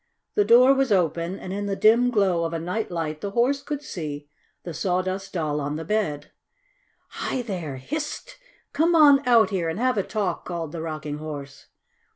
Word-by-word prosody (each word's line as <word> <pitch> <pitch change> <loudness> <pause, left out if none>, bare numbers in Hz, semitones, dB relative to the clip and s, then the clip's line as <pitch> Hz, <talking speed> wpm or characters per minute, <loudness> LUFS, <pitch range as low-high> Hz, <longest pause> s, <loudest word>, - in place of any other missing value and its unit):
The 415 - +3
door 255 -2 +7
was 270 -3 +1
open, 175 -1 +1
and 185 - -7
in 205 +1 -3
the 200 - -1
dim 230 +5 +4
glow 195 -7 +2
of 165 0 -2
a 165 - -2
night 180 +7 -3
light 160 -3 -4
the 200 - -3
Horse 270 +4 +2
could 295 -1 -5
see 150 - -6 0.3
the 170 - -6
Sawdust 185 +3 -2
Doll 150 -4 -1
on 145 +1 -3
the 160 +1 -5
bed. 155 -8 -2 0.8
"Hi 255 - -3
there! 175 - -5
Hist! 310 - -5 0.3
Come 330 +4 +3
on 290 -3 +7
out 230 -3 +5
here 175 -4 -1
and 165 - -4
have 250 -1 +1
a - - +1
talk!" 195 -5 -2
called 170 -3 -5
the 165 -1 -5
Rocking 155 -2 -5
Horse. 145 -3 -8
185 Hz, 190 wpm, -24 LUFS, 160-240 Hz, 0.8 s, door